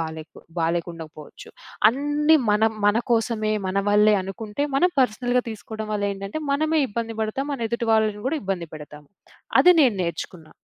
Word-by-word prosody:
బాలేకు 160 -1 -7 0.2
బాలేకుండకపోవచ్చు. 165 -2 -5 0.4
అన్ని 295 +4 +2
మనం 220 +1 +3
మన 205 - +4 0.2
కోసమే, 220 -1 0
మన 190 +1 -1
వల్లే 210 0 +5
అనుకుంటే, 210 +7 -5
మనం 360 +6 +3
పర్సనల్‌గా 245 +1 0
తీసుకోడం 220 0 -7
వల్లేంటంటే, 200 +3 -3
మనమే 310 +2 +1
ఇబ్బంది 225 +1 -4
బడతాం, 265 +6 -3
మన 235 -4 -3
ఎదుటి 235 0 -2
వాళ్ళని 215 -1 +1
గూడా 315 +3 -1
ఇబ్బంది 185 -3 -3
పెడతాం. 150 -1 -9 0.7
అది 360 - +7
నేను 255 -7 +4
నేర్చుకున్నా. 170 -1 -5
215 Hz, 140 wpm, -23 LUFS, 195-245 Hz, 0.7 s, అది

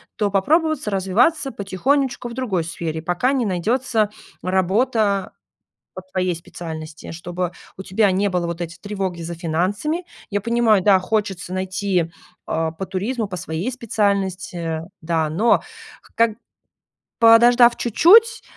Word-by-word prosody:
то 210 -2 0
попробоваться 300 - +1
развиваться 230 - +2
потихонечку 245 +6 -1
в - - -8
другой 225 -9 -1
сфере, 160 -1 -4
пока 180 +11 0
не 255 -4 0
найдётся 215 +4 0 0.3
работа 200 +2 +1 0.6
по 185 - -7
твоей 185 -1 0
специальности, 160 -1 -8
чтобы 175 +1 -4 0.3
у 190 - -7
тебя 195 +2 +2
не 200 +2 +1
было 180 -2 -1
вот 170 0 -5
эти 170 0 -5
тревоги 190 -4 -4
за 170 +1 -5
финансами. 195 - -2 0.2
Я 205 0 0
понимаю, 230 -2 +3
да, 200 -2 +6
хочется 195 -3 -2
найти, 185 -2 -1 0.3
э, 160 0 -1
по 195 - -3
туризму, 210 +5 -2
по 185 -2 -6
своей 170 +6 -3
специальности, 190 -8 -1 0.2
да, 160 -1 0
но, 210 +10 +3 0.5
ког 230 -1 +3 0.9
подождав 235 +1 +7
чуть-чуть 440 - +5
195 Hz, 130 wpm, -21 LUFS, 175-235 Hz, 0.9 s, подождав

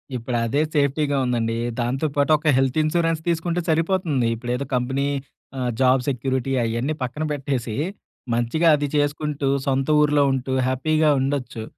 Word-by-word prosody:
ఇప్పుడు 120 0 -2
అదే 140 +6 +1
సేఫ్టీగా 145 0 +1
ఉందండి. 115 -2 0 0.2
దాంతో 130 +6 0
పాటు 145 +2 +2
ఒక 155 +1 -5
హెల్త్ 135 +2 +1
ఇన్స్‌రెన్స్ 165 0 0
తీసుకుంటే 170 +1 0
సరిపోతుంది. 160 -6 +1
ఇప్పుడేదో 125 +4 -3
కంపెనీ 130 +3 0 0.5
ఆహ్, 125 -1 -1
జాబ్ 130 0 +4
సెక్యూరిటీ 130 +1 -1
అయన్నీ 120 +6 -1
పక్కన 130 +5 -3
పెట్టేసి 135 -6 -2 0.6
మంచిగా 120 +8 +1
అది 145 0 -1
చేసుకుంటూ 145 -1 -1 0.2
సొంత 135 0 0
ఊర్లో 150 -1 +3
ఉంటూ 130 0 -2
హ్యాపీగా 155 +4 +2
ఉండొచ్చు. 135 -5 -2
135 Hz, 140 wpm, -22 LUFS, 125-150 Hz, 0.6 s, జాబ్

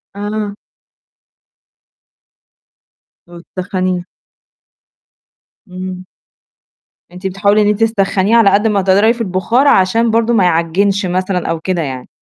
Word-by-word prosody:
آه. 205 0 -4 2.7
وتسخنيه. 180 +1 -4 1.6
إمم. 185 0 -7 1.1
أنتِ 180 +2 -6
بتحاولي 200 +2 +1
إن 205 - +2
أنتِ 210 +1 +1
تسخنيه 205 -1 +1
على 225 -4 +5
قد 205 +3 +2
ما 205 -2 +1
تقدري 200 +5 +3
في 235 - -7
البُخار، 225 +7 +1
عشان 225 +2 +3
برضه 230 +1 +1
ما 210 -5 +3
يعجّنش 180 +4 +1
مثلًا 185 0 -2
أو 165 -1 -2
كده 175 0 -2
يعني. 130 -4 -6
195 Hz, 110 wpm, -15 LUFS, 185-210 Hz, 2.7 s, على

